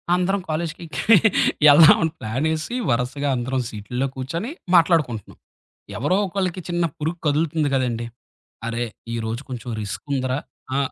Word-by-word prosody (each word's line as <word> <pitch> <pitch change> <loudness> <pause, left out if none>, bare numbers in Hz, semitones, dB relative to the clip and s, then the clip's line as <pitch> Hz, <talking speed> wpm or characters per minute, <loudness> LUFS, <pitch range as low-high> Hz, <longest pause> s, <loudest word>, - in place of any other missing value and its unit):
అందరం 190 +2 0
కాలేజికి 165 +1 -3 0.9
ఎళ్దాం 155 +2 +8
అని 160 - +1
ప్లానేసి 155 - -2
వరసగా 125 +4 0
అందరం 130 +1 -1
సీటుల్లో 125 +5 -3
కూర్చొని 165 - -4 0.2
మాట్లాడుకుంటున్నాం. 160 - +2 0.6
ఎవరో 165 +9 +1
ఒకళ్ళకి 185 -1 -2
చిన్న 175 0 0
పురుగు 160 +3 -2
కదులుతుంది 150 0 +1
గదండీ! 120 -3 -1 0.6
అరే, 115 +1 -2 0.3
ఈ - - -1
రోజు 115 +4 -3
కొంచెం 120 -1 -6
రిస్కుందిరా. 130 +4 -2 0.4
ఆ! - - +2
145 Hz, 120 wpm, -22 LUFS, 125-165 Hz, 0.9 s, ఎళ్దాం